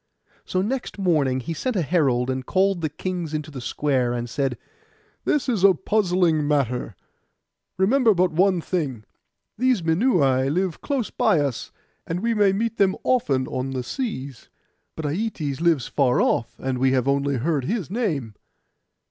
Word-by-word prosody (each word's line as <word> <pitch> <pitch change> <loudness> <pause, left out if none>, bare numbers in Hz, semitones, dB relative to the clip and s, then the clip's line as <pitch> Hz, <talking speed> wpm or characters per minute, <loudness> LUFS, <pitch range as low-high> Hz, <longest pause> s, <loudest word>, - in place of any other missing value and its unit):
So 185 0 -1
next 250 +3 -3
morning 150 -9 +1
he 165 - -4
sent 250 - -2
a 180 - +1
herald, 130 -5 +1
and 130 0 -3
called 190 +4 +1
the 155 - -1
kings 170 0 -4
into 155 0 -4
the 135 -3 -7
square, 130 -1 0
and 120 0 -3
said, 135 0 -2 0.7
'This 290 -3 +1
is 225 -7 0
a 195 -2 +7
puzzling 175 -6 +1
matter: 125 -7 0 0.8
remember 220 +3 +4
but 180 0 +2
one 180 +2 +2
thing. 145 - -3 0.6
These 250 -7 +2
Minuai 160 - +2
live 180 0 -1
close 270 -6 -2
by 220 -9 +2
us, 140 -5 -2 0.4
and 170 +2 -2
we 230 +1 +1
may 205 -3 +4
meet 225 +4 -1
them 195 -1 +3
often 140 - +1
on 130 +1 -4
the 130 -1 -3
seas; 140 - -5 0.5
but 160 - -5
Aietes 155 -4 -2
lives 165 -6 +2
afar 130 -4 +2
off, 115 - +1
and 130 -1 -3
we 130 0 +3
have 130 0 +1
only 140 0 +1
heard 140 +1 -1
his 190 - -2
name. 160 - -2
160 Hz, 165 wpm, -23 LUFS, 135-195 Hz, 0.8 s, a